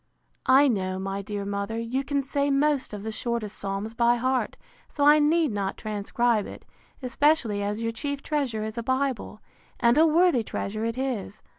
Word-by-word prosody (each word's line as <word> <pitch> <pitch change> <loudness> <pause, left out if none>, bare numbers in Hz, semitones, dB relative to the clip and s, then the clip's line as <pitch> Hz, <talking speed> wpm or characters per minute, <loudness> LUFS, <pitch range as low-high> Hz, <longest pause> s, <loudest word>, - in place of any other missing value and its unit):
I 270 +2 +6
know, 185 -6 -1
my 195 +1 -3
dear 200 0 -5
mother, 200 +2 -3
you 235 +4 -2
can 280 0 -1
say 280 +1 -1
most 280 0 +1
of 205 -1 -7
the 220 - -4
shortest 220 -2 -3
psalms 200 +3 -3
by 235 0 +3
heart; 255 +2 -1 0.3
so 285 - 0
I 300 +1 +7
need 310 -1 +3
not 200 -2 -3
transcribe 215 +1 0
it, - - -11 0.4
especially 250 -4 +2
as 205 +2 -2
your 230 - 0
chief 280 +5 -4
treasure 270 -8 -1
is 220 +2 -4
a - - -1
bible; 260 -3 -2 0.4
and 240 +4 +4
a 325 - +6
worthy 330 -4 +4
treasure 215 +1 -4
it 230 +1 -3
is. 245 -6 -4
235 Hz, 180 wpm, -26 LUFS, 210-275 Hz, 0.4 s, I